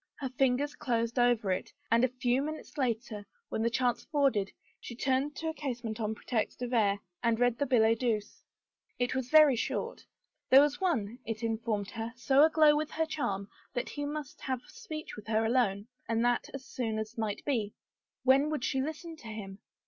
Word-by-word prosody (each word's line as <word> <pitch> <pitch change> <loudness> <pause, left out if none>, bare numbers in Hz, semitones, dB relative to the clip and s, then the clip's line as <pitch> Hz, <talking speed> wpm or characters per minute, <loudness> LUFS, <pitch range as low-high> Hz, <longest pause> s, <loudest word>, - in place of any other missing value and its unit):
Her 265 - -4
fingers 265 +3 +1
closed 235 -2 -1
over 240 -5 +3
it, 185 - -2 0.2
and 230 +1 +5
a - - +6
few 250 0 0
minutes 310 +2 -6
later, 235 -6 -2 0.3
when - - -2
the 230 - +2
chance 245 0 0
afforded, 275 -10 +1 0.3
she 235 - -8
turned 265 +3 0
to 325 - -4
a - - -3
casement 240 -7 -4
on 220 0 -1
pretext 230 +2 -2
of 245 0 -3
air, 205 -4 +3 0.2
and 230 -1 +1
read 245 -1 +2
the 285 - +1
billet 225 -3 +4
doux. 235 -4 +2 0.8
It 245 0 0
was 260 -1 -2
very 305 -3 +7
short. 465 - -3 0.5
There 265 - +9
was 295 +4 +1
one, 245 - 0
it 225 0 -5
informed 225 -3 -1
her, 225 0 -5
so 270 +3 +3
aglow 310 -1 +6
with 300 0 -1
her 320 0 0
charm 200 -11 -2 0.3
that 245 - -2
he 290 - -4
must 290 -1 -5
have 260 -2 -2
speech 325 -11 -8
with 210 0 -11
her 220 0 +2
alone 220 -4 +1 0.2
and 230 +1 +2
that 245 0 +1
as 270 -1 -7
soon 225 -4 -3
as 220 +2 -4
might 215 -2 -3
be. 225 -8 -1 0.5
When 270 +3 +5
would 305 -5 -2
she 265 - 0
listen 315 +3 -5
to 235 - -12
him? 205 -3 -7
245 Hz, 195 wpm, -31 LUFS, 225-280 Hz, 0.8 s, There